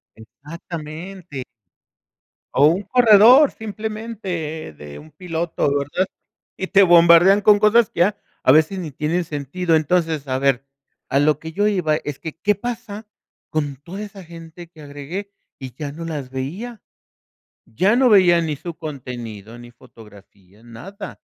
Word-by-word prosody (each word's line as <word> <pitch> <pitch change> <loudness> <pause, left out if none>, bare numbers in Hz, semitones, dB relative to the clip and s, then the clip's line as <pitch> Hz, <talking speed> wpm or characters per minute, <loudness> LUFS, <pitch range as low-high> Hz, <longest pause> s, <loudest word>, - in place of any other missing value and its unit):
Exactamente. 155 +5 -9 1.1
O 140 - +5
un 175 +6 +2
corredor 245 +5 +6
simplemente, 210 - -6
de 75 0 -10
un 80 +2 -14
piloto, 170 -4 -3
¿verdad? 145 +7 -1 0.5
Y 190 - -3
te 200 0 +5
bombardean 175 +2 +6
con 205 0 +5
cosas 215 +2 +4
que - - -6
ya 200 +4 +3 0.3
a 130 - +5
veces 160 +6 +3
ni 165 -4 -5
tienen 160 +6 -2
sentido. 160 +3 -1
Entonces, 160 -2 0
a 130 - -1
ver, 135 -1 +1 0.4
a 140 - +1
lo 150 0 +2
que 160 +1 -9
yo 205 +4 0
iba 165 -7 0
es 145 -3 -6
que, 160 -1 -8
¿qué 210 +3 +1
pasa 225 -1 -7 0.4
con 145 -3 -2
toda 175 +9 -9
esa 200 -2 -10
gente 165 0 -12
que 160 -3 -16
agregué 145 +8 -7 0.3
y 130 -3 -9
ya 145 +1 -6
no 165 +2 -8
las 145 -6 -5
veía? 180 - -6 0.8
Ya 205 +6 +1
no 260 -1 +4
veía 180 -5 +5
ni 155 -3 -3
su 170 +3 -8
contenido, 120 - -8
ni 120 0 -12
fotografías, 105 -3 -19
nada, 120 - -10
165 Hz, 150 wpm, -20 LUFS, 140-195 Hz, 1.1 s, corredor